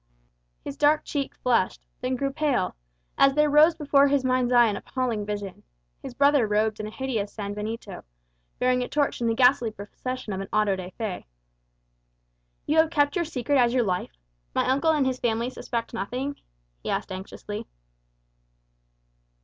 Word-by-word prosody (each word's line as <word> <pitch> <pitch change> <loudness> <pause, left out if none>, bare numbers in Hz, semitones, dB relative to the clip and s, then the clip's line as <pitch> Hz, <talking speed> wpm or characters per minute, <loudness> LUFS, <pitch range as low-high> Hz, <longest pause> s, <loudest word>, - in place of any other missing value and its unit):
His 140 - -6
dark 295 +1 +3
cheek 280 -2 -3
flushed, 235 -7 0
then 255 +1 -1
grew 275 +1 -2
pale, 285 -11 0 0.4
as 275 0 +5
there 300 -1 +3
rose 310 +3 +6
before 285 -2 +4
his 280 -1 +2
mind's 255 -1 +1
eye 240 -1 +7
an 210 -3 0
appalling 235 -3 -3
vision 205 -2 -5 0.4
his 245 - -8
brother 280 -4 +4
robed 210 +1 +1
in 215 - -4
a - - -5
hideous 225 -4 -3
sanbenito, 210 0 -5 0.5
bearing 250 0 +2
a 250 - -2
torch 290 -4 0
in 235 - +1
the 225 - +1
ghastly 250 -1 +4
procession 215 +2 -6
of 190 - -3
an 195 - -6
auto 210 -2 +2
da 185 -1 -7
fé! 215 -5 -4 1.4
"You 305 - +1
have 320 0 +5
kept 290 -1 +2
your 345 -2 0
secret 280 -2 0
as 240 0 +3
your 250 - +3
life? 180 - -3 0.4
My - - +1
uncle 280 +5 +2
and 300 -4 +3
his 260 -1 -1
family 235 +1 0
suspect 235 -2 -4
nothing?" 250 +6 -3 0.4
he - - -5
asked - - -2
anxiously. 190 +2 -7
250 Hz, 165 wpm, -26 LUFS, 210-280 Hz, 1.4 s, eye